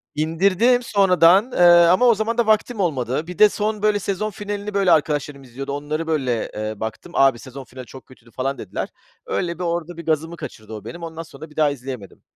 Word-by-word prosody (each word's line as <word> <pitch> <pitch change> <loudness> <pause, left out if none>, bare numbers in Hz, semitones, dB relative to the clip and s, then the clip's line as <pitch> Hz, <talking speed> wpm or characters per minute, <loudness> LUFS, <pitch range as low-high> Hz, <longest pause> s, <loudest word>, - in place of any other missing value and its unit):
İndirdim 195 +10 +2
sonradan, 195 +1 +4
eee, - - -4 0.3
ama 185 +8 +4
o 235 -3 +6
zaman 225 +3 -2
da 235 - +2
vaktim 220 +1 +1
olmadı. 140 -3 -1
Bir 180 -1 -8
de 210 - +8
son, 210 0 -2
böyle, 210 -1 +2
sezon 200 +2 -2
finalini, 205 +1 -5
böyle, 195 -3 +2
arkadaşlarım 145 -2 0
izliyordu. 135 +3 -7
Onları, 150 +3 -4
böyle, 130 -7 -1
eee, 110 0 -4
baktım, 110 +10 -6
"Abi, 135 -3 +4
sezon 135 +2 -10
finali 130 0 -11
çok 130 -1 -13
kötüydü." 120 -2 -19
falan 135 +3 -3
dediler. - - -5 0.4
Öyle 170 0 -3
bir - - -3
orada 170 0 -3
bir 170 - -8
gazımı 160 +1 -1
kaçırdı 110 -7 -9
o 105 - -8
benim, 170 0 -8
ondan 165 0 -6
sonra 155 0 -12
bir 150 - -19
daha 155 -2 +3
izleyemedim. 125 -6 -8
160 Hz, 205 wpm, -21 LUFS, 135-200 Hz, 0.4 s, de